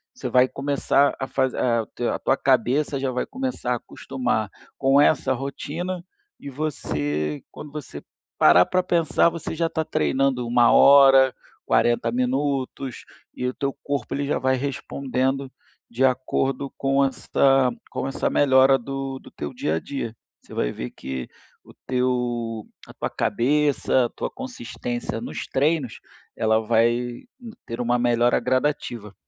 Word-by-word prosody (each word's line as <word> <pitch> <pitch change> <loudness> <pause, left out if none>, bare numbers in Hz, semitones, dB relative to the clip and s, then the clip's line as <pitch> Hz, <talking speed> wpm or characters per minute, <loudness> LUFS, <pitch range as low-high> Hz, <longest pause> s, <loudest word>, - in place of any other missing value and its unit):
você - - -5
vai 125 0 +5
começar 140 0 +1
a 130 - -3
fazer 130 -1 -1
a 115 -3 +1 0.3
a - - -5
tua 135 - +2
cabeça 135 +2 +1
já 135 - -1
vai 125 - -2
começar 260 - -3
a - - +1
acostumar 120 -4 -3 0.3
com 135 +1 +4
essa 145 -3 +3
rotina, 160 +7 -5 0.4
e 140 - -8
você 75 - -3
quando 150 - -10
você 150 -4 -8 0.4
parar 85 +4 +7
para 185 0 +1
pensar, 170 -1 +2
você 165 -1 -6
já 170 - 0
está 160 - -2
treinando 135 -4 0
1 120 0 +4
hora, 135 -2 +7 0.3
40 120 -1 +2
minutos, 130 +1 -2 0.3
e 125 - -2
o - - 0
teu 140 0 -2
corpo 140 -4 -3
ele 140 0 -2
já - - +1
vai 130 0 +2
respondendo 135 0 -2 0.4
de 125 +3 +1
acordo 130 +1 0
com 135 0 +2
esta, 135 -1 +2 0.2
com - - -3
essa 135 - -1
melhora 135 -1 +5
do 135 +1 -5
do - - -15
teu 75 - -6
dia 80 - -1
a 80 - 0
dia. 115 -2 -5 0.3
Você - - -14
vai - - -1
ver - - -6
que 65 -2 -6 0.4
o - - -17
teu 120 -3 -1 0.2
a - - -12
tua - - -3
cabeça, 140 -1 +1
a - - -3
tua - - -5
consistência 125 - -5
nos 120 - -5
treinos, 140 -3 0 0.4
ela 110 0 +2
vai 120 +2 +1 0.4
ter 115 +1 -4
uma 120 0 +1
melhora 120 0 +3
gradativa. 125 -4 -1
130 Hz, 150 wpm, -23 LUFS, 120-140 Hz, 0.4 s, parar